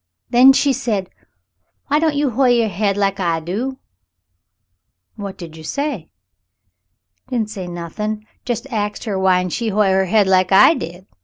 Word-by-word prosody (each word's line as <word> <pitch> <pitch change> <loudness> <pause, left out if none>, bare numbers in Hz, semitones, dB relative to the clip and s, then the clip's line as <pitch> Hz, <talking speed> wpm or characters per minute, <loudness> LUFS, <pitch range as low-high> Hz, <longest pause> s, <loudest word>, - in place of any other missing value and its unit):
Then 250 +3 +8
she 275 +1 +2
said, 215 -8 -2 0.8
'Whyn't 305 +1 +2
you 285 -2 +1
hoi' 260 +3 +2
your 235 -3 +3
hade 200 +1 -1
like 200 0 0
I 170 -3 0
do 220 +11 -4 0.7
?'" 90 -1 -54
"What 200 -2 -7
did 165 -3 -10
you 160 - -11
say 280 - -3 0.6
?" 90 0 -52
"Didn't 225 -4 -2
say 190 -4 -6
nothin.' 210 +5 -5 0.2
Jes' 240 -1 -3
axed 210 -2 -3
her 210 -4 -3
whyn't 180 -2 +2
she 230 -2 -1
hoi' 205 -1 +2
her 190 0 +2
head 205 +2 +3
like 185 -1 +2
I 195 +11 +7
did. 180 - -7
195 Hz, 165 wpm, -19 LUFS, 175-235 Hz, 0.8 s, Then